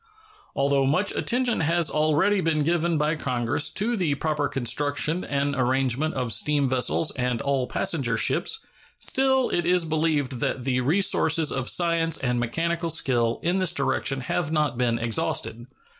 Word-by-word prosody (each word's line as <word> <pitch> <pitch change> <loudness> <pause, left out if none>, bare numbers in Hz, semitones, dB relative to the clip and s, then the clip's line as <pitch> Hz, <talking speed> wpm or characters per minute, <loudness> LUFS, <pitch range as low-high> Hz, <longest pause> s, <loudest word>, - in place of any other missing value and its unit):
Although 140 -1 +1
much 180 +9 +1
attention 245 0 0
has 165 +1 +1
already 155 +6 +2
been 155 -3 0
given 170 +1 +1
by 150 +1 +1
Congress 125 -2 -1
to 235 +4 0
the 170 -9 0
proper 150 0 -1
construction 145 +5 0
and 140 0 -1
arrangement 130 +3 0
of 125 -4 -1
steam 145 +6 +1
vessels 130 +5 0
and 125 -2 -2
all 135 0 -1
passenger 135 - 0
ships, 445 - 0 0.3
still 265 -1 +1
it 175 -1 -1
is 180 -1 +2
believed 155 -5 -1
that 125 - -2
the 130 -1 0
resources 160 0 +2
of 130 -1 -2
science 165 -2 +1
and 125 -2 -1
mechanical 165 +8 -2
skill 120 -7 +1
in 175 +3 +1
this 185 -2 0
direction 135 -4 -1
have 155 +5 -2
not 150 -5 0
been 120 -1 0
exhausted. 115 +1 -2
150 Hz, 155 wpm, -24 LUFS, 130-170 Hz, 0.3 s, already